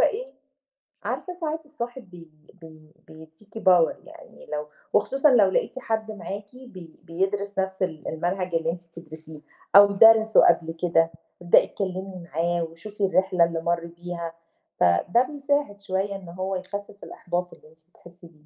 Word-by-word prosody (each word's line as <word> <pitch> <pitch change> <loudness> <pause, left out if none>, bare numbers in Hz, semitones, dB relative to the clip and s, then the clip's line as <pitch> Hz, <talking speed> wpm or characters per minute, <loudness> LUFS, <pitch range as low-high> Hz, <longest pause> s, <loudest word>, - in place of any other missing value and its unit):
إيه، - - 0 0.7
عارفة 360 - -4
ساعات 320 -2 -4
الصاحب 245 -7 -7
بي 170 -3 -14 0.3
بي 155 -1 -15
بيدّيكي 160 +8 -13
power 175 -3 +5
يعني - - -15
لو 150 0 -3 0.3
وخصوصًا 270 +7 +3
لو 205 -6 +5
لقيتِ 260 - -1
حد 220 -2 -2
معاكِ 205 +2 -8
بي 180 -7 -13
بيدرس 195 +4 -2
نَفْس 190 0 -1
ال 160 -4 -4
المنهج 175 +2 -2
اللي 165 0 +1
أنتِ 170 0 -10
بتدرسيه 155 -2 -12 0.3
أو 205 0 +11
درَسه 220 +2 +6
قبل 165 -1 +3
كده، 165 -1 +1 0.3
ابدئي 175 - +5
اتكلمي 185 -2 -5
معاه 170 +1 0
وشوفي 195 +5 -4
الرحلة 185 -2 +2
اللي 165 -1 -3
مَر 170 0 -1
بيها 170 -1 -7 0.5
فده 90 - +3
بيساعد 285 -6 -2
شوية 195 +1 -2
إن 185 -3 -9
هو 185 +2 -3
يخفف 200 +2 -7
الإحباط 175 0 -4
اللي 155 - -18
أنتِ 160 - -23
بتحسّي 175 -1 -16
بيه. 155 -2 -25
185 Hz, 150 wpm, -25 LUFS, 165-205 Hz, 0.7 s, أو